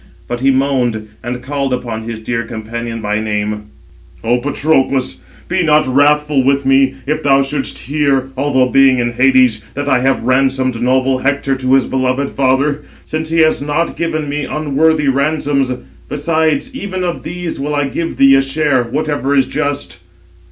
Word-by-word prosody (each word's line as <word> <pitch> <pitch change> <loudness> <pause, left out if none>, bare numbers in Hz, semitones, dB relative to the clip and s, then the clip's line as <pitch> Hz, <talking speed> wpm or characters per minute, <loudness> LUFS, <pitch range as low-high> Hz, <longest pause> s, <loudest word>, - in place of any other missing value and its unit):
But 120 0 -3
he 135 +2 +2
moaned, 130 -5 0
and 125 +1 -5
called 140 0 -2
upon 115 -3 -4
his 115 - -4
dear 115 +1 -3
companion 115 0 -6
by 105 +1 0
name: 105 -1 -2 0.6
"O 120 +2 +2
Patroclus, 135 -1 0 0.3
be 180 +1 0
not 155 -2 +3
wrathful 145 +1 +2
with 140 +1 +1
me, 135 0 +3
if 150 +2 -1
thou 140 -1 +3
shouldst 135 -1 -3
hear, 140 -1 0
although 135 -1 +2
being 135 0 +4
in 120 -1 0
Hades, 125 -3 +3
that 145 +1 -3
I 135 -3 +3
have 135 0 +1
ransomed 130 -1 +1
noble 130 +1 +2
Hector 135 0 0
to 130 0 0
his 135 - +3
beloved 130 +1 -1
father, 140 +2 +1 0.2
since 155 0 -4
he 165 0 +2
has 155 -2 +3
not 150 +4 -1
given 155 -3 -2
me 145 0 -2
unworthy 155 0 +1
ransoms. 140 -1 +1 0.4
Besides 160 - 0
even 185 -7 -4
of 175 -1 -3
these 175 -1 -5
will 150 +2 -2
I 145 -1 0
give 165 +4 -4
thee 135 0 +6
a 135 - +5
share, 135 -2 0
whatever 145 +1 -1
is 135 - +4
just." 145 -9 -3
135 Hz, 165 wpm, -15 LUFS, 130-150 Hz, 0.6 s, thee